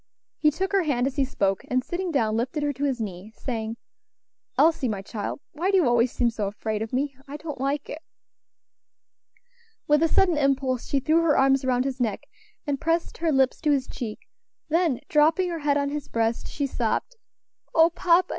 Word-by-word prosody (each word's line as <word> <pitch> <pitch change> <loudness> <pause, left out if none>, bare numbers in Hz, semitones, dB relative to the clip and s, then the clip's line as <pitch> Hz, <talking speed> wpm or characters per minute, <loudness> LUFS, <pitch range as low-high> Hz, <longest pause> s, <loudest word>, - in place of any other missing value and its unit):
He 305 - +5
took 375 +6 -2
her 395 -1 +3
hand 270 -7 0
as 270 +1 -3
he 275 - +3
spoke, 195 -8 0
and 255 0 +1
sitting 360 +4 -3
down, 225 -9 +1
lifted 255 +6 -1
her 290 0 0
to 280 +2 -2
his 265 -3 -1
knee, 200 -1 -6
saying, 225 -3 -4 0.8
"Elsie, 320 -5 +4
my 200 -4 -3
child, 210 +6 -5
why 340 +6 -1
do 390 - +4
you 340 -8 +4
always 240 0 +3
seem 240 -2 +1
so 215 -3 -2
afraid 215 +1 -3
of 220 - -4
me? 275 +2 -1
I 285 +2 -6
don't 300 -4 -7
like 280 +2 -1
it." 310 - -7 1.9
With 295 0 +4
a 330 - +5
sudden 345 -2 +3
impulse 270 -3 +1
she 280 - +1
threw 315 +5 +3
her 325 -3 +3
arms 270 0 +4
round 250 0 +1
his 265 -1 -3
neck, 220 -5 -1 0.4
and 285 -1 -2
pressed 330 +1 -1
her 330 -1 +1
lips 265 -2 +2
to 305 - +1
his 275 -3 +2
cheek; 220 -4 -7 0.4
then 325 -5 +1
dropping 320 +5 +3
her 335 - -3
head 290 -1 +1
on 280 0 0
his 290 -1 -4
breast, 230 0 -1
she 285 - -2
sobbed: 255 - -2 0.6
"O 325 +1 +6
papa! 350 +1 +3
275 Hz, 200 wpm, -25 LUFS, 240-315 Hz, 1.9 s, O